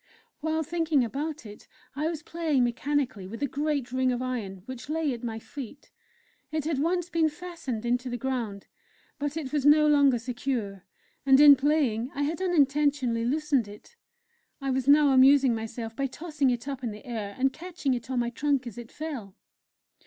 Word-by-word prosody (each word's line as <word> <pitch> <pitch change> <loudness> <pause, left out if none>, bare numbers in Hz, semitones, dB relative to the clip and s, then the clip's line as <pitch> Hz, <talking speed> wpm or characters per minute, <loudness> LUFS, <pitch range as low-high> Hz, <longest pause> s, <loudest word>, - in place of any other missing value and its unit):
While 315 +1 -1
thinking 320 -3 +1
about 290 +4 -4
it 210 -1 -12 0.3
I 300 +2 -1
was 320 -2 -4
playing 315 -6 0
mechanically 255 -4 -1
with 230 +8 -6
a - - +2
great 285 -2 -2
ring 260 0 +1
of 245 - -1
iron 220 -8 -4
which 255 0 -8
lay 310 -3 0
at 235 - -8
my 225 -2 -3
feet. 275 +4 -9 0.6
It 310 -1 -1
had 310 -4 -1
once 350 +3 0
been 325 -2 +2
fastened 310 -9 -6
into 245 +1 0
the 245 - -3
ground, 235 -6 -3 0.5
but 290 +2 -3
it 285 -4 -5
was 295 -3 +1
no 300 +1 +6
longer 285 -4 +5
secure, 230 -5 -4 0.4
and 270 0 +6
in 290 -1 +10
playing 265 -5 +1
I 285 - 0
had 320 +5 -2
unintentionally 285 -8 +2
loosened 285 -3 +1
it. 210 - -14 0.6
I 275 -1 -2
was 260 0 -1
now 290 0 +6
amusing 265 -1 +6
myself 225 0 -5
by 275 +2 -1
tossing 295 -1 -1
it 245 +1 -2
up 270 -2 -5
in 240 - -1
the 210 0 -10
air, 215 -4 -5
and 265 +1 +1
catching 330 -4 -3
it 240 0 -5
on 260 - -2
my 240 0 0
trunk 280 +1 0
as 235 -1 -7
it 235 -1 -10
fell. 265 -11 -6
270 Hz, 185 wpm, -27 LUFS, 240-300 Hz, 0.6 s, in